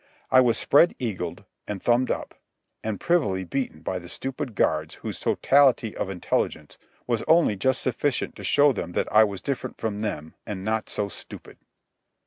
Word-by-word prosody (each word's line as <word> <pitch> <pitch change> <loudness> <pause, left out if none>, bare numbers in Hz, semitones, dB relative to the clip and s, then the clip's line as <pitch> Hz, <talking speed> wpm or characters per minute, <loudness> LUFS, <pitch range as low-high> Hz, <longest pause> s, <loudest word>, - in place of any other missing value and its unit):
I 130 - +7
was 120 -2 +3
spread 165 +5 +4
eagled, 115 -8 -4 0.2
and 105 -2 -4
thumbed 120 +5 +2
up, - - -3 0.5
and 110 -3 -3
privily 105 - +1
beaten 130 +8 -3
by 95 - -3
the 90 -1 -11
stupid 130 -2 -4
guards 80 -3 0
whose - - -6
totality 135 -5 +3
of - - -3
intelligence 85 -4 -2 0.3
was 120 -2 0
only 165 -10 +4
just 130 +7 0
sufficient 130 +1 -1
to - - -9
show 145 0 +4
them 90 -6 -5
that - - -1
I 110 +1 +8
was 100 -3 -3
different 140 -2 -3
from 105 -2 -3
them 80 -8 -4
and 95 -2 -6
not 110 0 -1
so 105 - 0
stupid. - - -11
110 Hz, 170 wpm, -25 LUFS, 95-130 Hz, 0.5 s, I